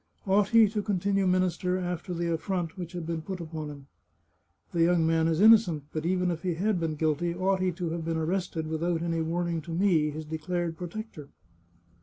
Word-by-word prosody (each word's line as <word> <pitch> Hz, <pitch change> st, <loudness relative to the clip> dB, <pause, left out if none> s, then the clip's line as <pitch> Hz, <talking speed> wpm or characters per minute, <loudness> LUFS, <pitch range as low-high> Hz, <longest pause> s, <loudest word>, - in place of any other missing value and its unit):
Ought 200 Hz, +1 st, +3 dB
he 230 Hz, -1 st, +6 dB
to 210 Hz, 0 st, -2 dB
continue 195 Hz, -1 st, 0 dB
minister 185 Hz, 0 st, +1 dB
after 180 Hz, 0 st, -4 dB
the 170 Hz, -1 st, -1 dB
affront 170 Hz, 0 st, -2 dB
which 175 Hz, -1 st, -7 dB
had 175 Hz, -2 st, -5 dB
been 165 Hz, -1 st, -3 dB
put 185 Hz, +3 st, -6 dB
upon 160 Hz, -2 st, -6 dB
him? 140 Hz, -2 st, -11 dB, 0.4 s
" 85 Hz, +1 st, -44 dB
The 170 Hz, -, +1 dB
young 170 Hz, -1 st, +4 dB
man 160 Hz, 0 st, +2 dB
is 165 Hz, 0 st, +1 dB
innocent; 205 Hz, -8 st, +6 dB
but 155 Hz, +1 st, -2 dB
even 180 Hz, 0 st, +1 dB
if 165 Hz, -1 st, -4 dB
he 180 Hz, -3 st, -1 dB
had 195 Hz, +2 st, 0 dB
been 160 Hz, -2 st, -1 dB
guilty, 160 Hz, +3 st, 0 dB
ought 190 Hz, +1 st, +1 dB
he 185 Hz, -1 st, +2 dB
to 170 Hz, -1 st, -3 dB
have 165 Hz, 0 st, -3 dB
been 165 Hz, 0 st, -1 dB
arrested 165 Hz, 0 st, -2 dB
without 165 Hz, +1 st, -1 dB
any 165 Hz, -1 st, -1 dB
warning 170 Hz, 0 st, -1 dB
to 165 Hz, -, -9 dB
me, 165 Hz, -3 st, +2 dB
his 155 Hz, +1 st, -6 dB
declared 165 Hz, +2 st, -3 dB
protector 175 Hz, -4 st, -7 dB
170 Hz, 205 wpm, -28 LUFS, 160-185 Hz, 0.4 s, he